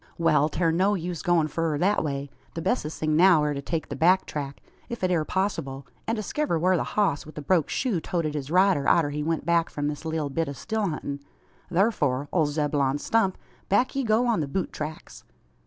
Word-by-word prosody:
"Wal, 155 -2 +3
'tair 165 +1 +1
no 190 +5 +2
use 175 -2 -4
goin' 175 -4 +2
furrer 160 0 -1
thet 195 +5 +2
way. 140 -2 -3 0.2
The 165 - -3
bessest 160 -11 -1
thing 155 -1 +1
now 170 -2 +6
air 150 0 0
to 140 - -4
take 160 +2 -3
the 140 - -4
back 180 +7 +4
track, 140 -2 -5 0.3
if 235 -4 -6
it 185 - +2
air 165 -3 +2
possable, 155 -7 -2 0.2
an 225 - +1
diskiver 215 - -1
whar 185 +3 +3
the - - 0
hoss 195 -9 0
wi' 155 - -12
the 150 - -5
broke 170 -1 +2
shoe 225 -11 0
toted 160 -2 -2
his 145 -2 -4
rider 185 -4 +3
arter 150 -4 +3
he 150 +1 -3
went 160 0 -1
back 170 0 +2
from 145 0 -2
this 150 0 -6
leetle 160 -3 -2
bit 165 +1 -1
o' - - -4
still 220 - -2
huntin'. 145 -3 -4 0.5
Thurfor, 150 - +1
ole 160 -4 +3
Zeb'lon 145 -2 0
Stump, 195 +3 +1 0.3
back 205 +8 +2
ye 275 - 0
go 225 +1 +2
on 235 -5 +2
the 150 - -1
boot 180 +6 -3
tracks!" 155 +1 -7
165 Hz, 215 wpm, -26 LUFS, 150-190 Hz, 0.5 s, now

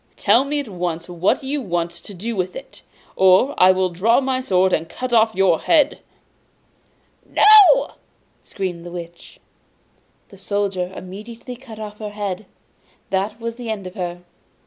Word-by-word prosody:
'Tell 250 - +4
me 290 +1 -2
at 285 - -5
once 175 -4 -4
what 175 +7 0
you 280 +2 -2
want 175 -5 -2
to 170 +4 -12
do 225 +6 -4
with 185 -1 -3
it, - - -11 0.3
or 190 +9 +4
I 185 +1 +7
will 185 0 +1
draw 210 +9 +3
my 260 -1 -1
sword, 185 -6 +2
and 165 - -1
cut 255 -1 -5
off 220 -1 +3
your 185 -4 +3
head!' 300 -3 +2 1.3
'No!' 425 +3 +7 0.5
screamed 185 -4 -5
the 175 - -8
Witch. 170 -1 -10 0.9
The 195 - -16
Soldier 195 -2 -2
immediately 225 +6 -9
cut 240 -3 -12
off 210 -1 -8
her 210 -1 -5
head. 205 -1 -5 0.6
That 200 +3 -1
was 230 0 -5
the 240 -2 -7
end 210 -3 -4
of 185 - -8
her! 175 -2 -5
200 Hz, 160 wpm, -20 LUFS, 180-235 Hz, 1.3 s, I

